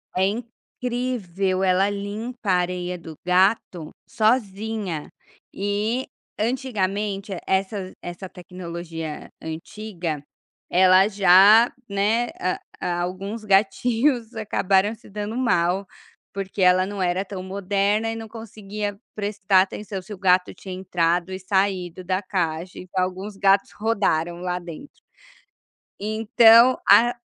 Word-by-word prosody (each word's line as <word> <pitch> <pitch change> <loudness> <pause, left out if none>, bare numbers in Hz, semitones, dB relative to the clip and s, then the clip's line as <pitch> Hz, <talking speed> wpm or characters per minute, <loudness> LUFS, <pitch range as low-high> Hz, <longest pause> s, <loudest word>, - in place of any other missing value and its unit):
É 185 +1 +3
incrível, 225 -4 -3
ela 190 +1 +3
limpa 210 +3 -5
a - - +4
areia 180 0 -2
do 160 -2 -10
gato 180 -3 +2 0.2
sozinha, 215 - -1 0.4
e 210 +5 -1 0.3
antigamente 210 -4 -2 0.2
essa 190 0 -1
essa 175 +2 -8
tecnologia 170 -3 -7
antiga, 165 -1 -5 0.5
ela 185 +1 +6
já, 200 +3 +6 0.2
né 210 +4 +1 0.5
a 175 0 -1
alguns 195 +5 -4
gatinhos 225 +5 +2
acabaram 200 -1 +1
se 230 +1 -16
dando 210 +2 -5
mal, 195 -6 +1 0.4
porque 195 0 -5
ela 185 0 +5
não 200 0 -5
era 180 +2 0
tão 190 -1 -6
moderna, 200 +3 0
e - - -4
não 225 0 -7
conseguia 210 -2 -6 0.2
prestar 200 -2 +2
atenção 195 +1 -4
se 200 +3 -9
o - - -8
gato 185 -1 +2
tinha 190 -2 -8
entrado 175 -1 0
e 185 - -5
saído 185 -2 -1
da 185 +1 -1
caixa. 180 -2 -3
Então 185 0 -2
alguns 190 +3 -5
gatos 195 0 +3
rodaram 175 -6 0
lá 180 0 -2
dentro. 175 - -11 1.0
Então, 225 +3 +5
a 240 +1 +6
195 Hz, 115 wpm, -23 LUFS, 180-215 Hz, 1.0 s, ela